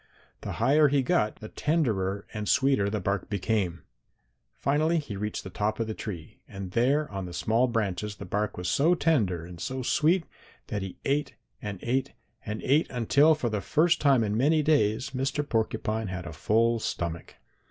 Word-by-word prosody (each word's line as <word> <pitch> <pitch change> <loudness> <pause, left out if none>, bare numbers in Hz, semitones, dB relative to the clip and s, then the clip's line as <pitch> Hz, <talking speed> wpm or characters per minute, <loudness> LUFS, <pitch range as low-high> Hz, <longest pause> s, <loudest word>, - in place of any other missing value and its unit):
The - - -5
higher 145 +6 +4
he 140 -1 +2
got 105 -3 +1
the 110 - -6
tenderer 105 - 0
and 105 -1 -3
sweeter 130 -5 +3
the 105 +1 -2
bark 100 0 -2
became. 100 -4 -1 0.7
Finally 155 +4 +1
he 145 -10 -4
reached 105 +2 -4
the 95 - -8
top 105 +4 -1
of 115 - 0
the 110 - -4
tree, 90 -8 -7
and 95 -2 -7
there 140 +8 +2
on 95 -2 -4
the 90 - -8
small 115 +7 +2
branches 105 -3 -2
the - - -8
bark 105 0 -2
was 90 0 -4
so 165 +6 +3
tender 105 - +1
and 85 -1 -10
so 130 +4 -3
sweet 165 +7 +2 0.5
that 105 - -2
he 95 -1 -6
ate 140 0 0 0.3
and 105 -2 -5
ate 130 +3 -1 0.3
and 105 +1 -5
ate 145 +5 +3
until 140 +6 +4
for 130 -6 -2
the 105 -2 -1
first 165 - +2
time 135 -5 +4
in 105 -1 -1
many 150 +6 +3
days 130 -4 +2
Mr. 135 +3 -2
Porcupine 110 -1 -1
had 95 -1 -5
a - - -7
full 115 +2 +2
stomach. 85 -5 -4
110 Hz, 185 wpm, -27 LUFS, 100-140 Hz, 0.7 s, higher